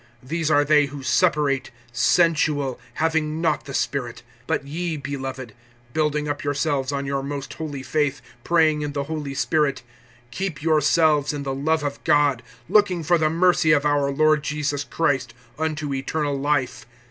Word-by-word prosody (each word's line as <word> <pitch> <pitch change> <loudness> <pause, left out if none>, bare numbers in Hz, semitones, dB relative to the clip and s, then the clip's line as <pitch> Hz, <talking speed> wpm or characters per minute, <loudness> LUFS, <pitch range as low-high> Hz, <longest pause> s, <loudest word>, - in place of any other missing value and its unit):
(19)These 160 +3 -1
are 145 -1 +4
they 150 0 +4
who 140 -1 -9
separate; 145 -2 +1 0.2
sensual, 145 0 +2 0.2
having 160 -1 0
not 160 -3 0
the 140 - -8
Spirit. 120 -4 -2 0.2
(20)But - - 0
ye, 160 +3 -3
beloved, 135 -4 -6 0.4
building 150 -1 0
up 145 0 -3
yourselves 145 -1 -1
on 140 -1 -2
your 135 0 -1
most 140 0 -5
holy 145 -4 -6
faith, 145 -1 0 0.2
praying 160 -3 +3
in 145 -1 -3
the 140 -1 -2
Holy 145 -2 -5
Spirit, 150 -2 0 0.5
(21)keep 185 -7 -4
yourselves 155 -1 +3
in 145 -1 -4
the 135 -1 -3
love 155 +3 0
of 145 -1 -4
God, 145 -4 +3 0.3
looking 185 -3 +3
for 170 +2 +3
the 155 -1 +2
mercy 170 -1 +3
of 145 -1 +2
our 145 -1 +2
Lord 155 +2 +3
Jesus 145 -2 -2
Christ, 135 -6 -1 0.2
unto 155 -2 -2
eternal 145 +2 -2
life. 135 -4 -1
145 Hz, 160 wpm, -23 LUFS, 140-155 Hz, 0.5 s, are